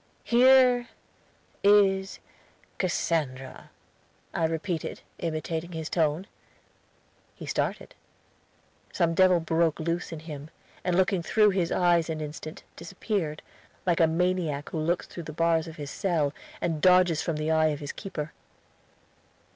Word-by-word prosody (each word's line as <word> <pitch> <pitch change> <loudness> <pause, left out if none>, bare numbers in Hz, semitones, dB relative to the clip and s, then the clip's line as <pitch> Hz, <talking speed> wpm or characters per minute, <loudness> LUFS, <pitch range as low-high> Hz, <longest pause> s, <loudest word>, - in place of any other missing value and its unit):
"Here 250 0 +5 0.8
is 195 -1 +4 0.6
Cassandra," 145 -8 -2 0.6
I 165 - +1
repeated, 165 +1 -3 0.2
imitating 160 +1 -3
his 160 -1 -5
tone. 160 +1 +1 1.1
He - - -9
started. - - -2 1.0
Some 170 -2 +1
devil 185 0 +5
broke 165 -1 +1
loose 170 +2 -2
in 160 -2 -7
him, 150 -2 -8 0.3
and 180 -1 0
looking 190 0 +2
through 210 +4 +3
his 180 -3 0
eyes 175 -2 +3
an 160 -1 -3
instant, 155 +1 -7
disappeared, 170 -2 -3 0.4
like 175 -2 +2
a 165 - +5
maniac 165 -3 -1
who 160 - -3
looks 170 +3 0
through 170 - -8
the - - -6
bars 165 0 +1
of 160 - -9
his 145 -3 -7
cell, 165 -7 0 0.3
and 165 -3 -1
dodges 180 -3 +5
from 165 - -2
the 155 +1 -1
eye 160 0 +4
of 150 -2 -2
his 145 0 -5
keeper. 155 -7 -6
165 Hz, 130 wpm, -27 LUFS, 155-185 Hz, 1.1 s, Here